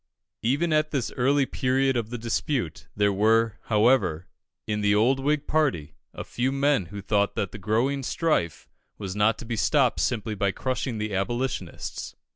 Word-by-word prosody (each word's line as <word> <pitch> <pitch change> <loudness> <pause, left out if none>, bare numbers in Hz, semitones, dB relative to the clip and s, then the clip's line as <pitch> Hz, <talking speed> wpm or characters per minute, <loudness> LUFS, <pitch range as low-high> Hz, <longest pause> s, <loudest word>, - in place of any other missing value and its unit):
Even 145 +8 +1
at 155 0 +2
this 135 -6 -2
early 135 +2 +2
period 130 +1 +1
of 115 -2 -1
the 120 - -4
dispute, 115 - -2
there 100 -1 +2
were, 110 +2 +2
however, 105 -7 +2 0.4
in 105 -1 -2
the 105 0 +3
old 125 +6 +3
Whig 150 +2 0
party, 130 - 0 0.2
a - - -7
few 125 +2 -1
men 140 - +1
who 100 +3 -7
thought 100 0 +1
that 100 - -2
the 110 - -8
growing 115 +8 0
strife 135 - -1 0.3
was 95 -2 -5
not 105 +2 +3
to - - -9
be 115 0 -3
stopped 130 +3 +2
simply 110 -3 -1
by 100 -1 0
crushing 130 +1 -2
the 105 -1 -3
Abolitionists. 100 -1 -3
115 Hz, 170 wpm, -26 LUFS, 100-135 Hz, 0.4 s, the